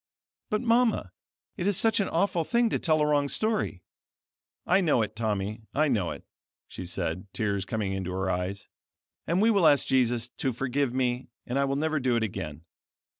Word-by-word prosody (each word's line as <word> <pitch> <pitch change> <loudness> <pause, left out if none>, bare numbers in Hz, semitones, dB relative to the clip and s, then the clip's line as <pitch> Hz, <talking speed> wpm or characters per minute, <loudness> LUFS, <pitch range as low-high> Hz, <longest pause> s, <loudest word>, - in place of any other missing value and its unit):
"But, 215 +1 0
Mama, 230 - +2 0.5
it 175 - -1
is 205 -3 +3
such 225 0 +4
an 195 - 0
awful 170 0 +1
thing 235 +4 +1
to - - 0
tell 155 -2 +2
a - - +4
wrong 145 -1 +2
story." 215 - -1 0.8
"I 190 +3 +4
know 150 -10 +3
it 105 - -5
Tommy, 105 -1 -2
I 155 +1 +3
know 105 -9 +1
it," - - -7 0.4
she 90 - -7
said, 90 +2 -3
tears 100 -3 -1
coming 100 -1 -2
into 95 -2 -3
her 95 +1 -2
eyes; 95 +2 -3 0.6
"and 175 +5 +2
we 230 - +5
will 195 -6 +4
ask 145 -2 +4
Jesus 120 -2 +2
to 130 +1 -3
forgive 130 +2 -1
me 125 0 -1 0.2
and 125 +3 -1
I 140 - +3
will 135 0 -1
never 155 +1 0
do 130 -2 +1
it 115 - +1
again." 80 -7 -5
130 Hz, 190 wpm, -27 LUFS, 105-170 Hz, 0.8 s, we